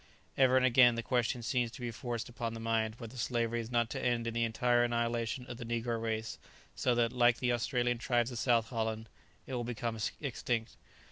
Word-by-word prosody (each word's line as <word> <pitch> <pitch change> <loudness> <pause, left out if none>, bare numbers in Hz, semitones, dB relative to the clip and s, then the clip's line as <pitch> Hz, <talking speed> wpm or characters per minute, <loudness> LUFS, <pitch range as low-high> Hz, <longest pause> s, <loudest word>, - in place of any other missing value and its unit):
Ever 130 -1 +5
and 130 - +4
again 125 -1 +6
the 115 - -3
question 120 +1 0
seems 125 -1 0
to - - -10
be 120 -1 -3
forced 120 0 -4
upon 115 -1 -4
the - - -6
mind 115 -1 0
whether 115 +1 -9
slavery 120 -1 0
is 115 -1 -5
not 120 -2 +2
to - - -4
end 120 -2 +1
in 115 - -2
the 115 0 +1
entire 120 +1 +2
annihilation 120 0 -1
of 125 -1 -7
the 120 - -6
negro 115 0 -2
race, 110 -1 -3 0.3
so 125 -2 +1
that, 120 -1 +2
like 120 -1 +4
the 125 -1 +1
Australian 120 0 0
tribes 120 0 +1
of 120 - -4
South 115 -2 +2
Holland, 110 -2 -3 0.4
it 130 - -7
will 120 -1 -1
become 115 -1 -3 0.2
extinct. 120 -4 -2
120 Hz, 210 wpm, -32 LUFS, 115-120 Hz, 0.4 s, again